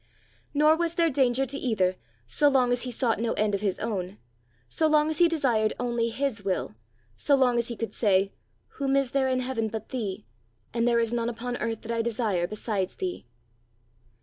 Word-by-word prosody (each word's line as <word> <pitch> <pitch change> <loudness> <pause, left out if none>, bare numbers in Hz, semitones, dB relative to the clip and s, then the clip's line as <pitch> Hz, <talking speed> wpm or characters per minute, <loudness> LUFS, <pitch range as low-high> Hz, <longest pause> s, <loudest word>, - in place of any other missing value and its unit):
Nor 305 +2 +4
was 340 0 -1
there 335 -2 +3
danger 260 -1 +2
to 275 +2 -4
either 190 -7 +1 0.3
so 290 - +2
long 255 -3 +3
as 245 0 +1
he 255 - -4
sought 235 -2 0
no 230 0 0
end 210 -1 0
of 200 - -1
his 200 -3 0
own, 200 -3 -3 0.5
so 315 - +1
long 305 0 +3
as 315 - -4
he 345 - +7
desired 250 -10 +1
only 235 -1 0
His 235 -3 -2
will, 190 - -2 0.4
so 285 - +2
long 250 -3 +3
as 235 - -1
he 235 - -5
could 230 0 -4
say, 195 -3 +2 0.5
"Whom 275 -1 +1
is 275 -3 +1
there 270 -1 +2
in 255 -1 +1
heaven 250 -3 -1
but 220 0 -6
thee! 210 - -4 0.5
and 230 0 +1
there 235 -1 +3
is 230 0 0
none 235 0 0
upon 245 +1 -4
earth 225 -1 -3
that 230 - -5
I 230 0 +1
desire 220 -6 0
besides 205 -2 -3
thee!" 365 - -5
235 Hz, 200 wpm, -27 LUFS, 215-270 Hz, 0.5 s, he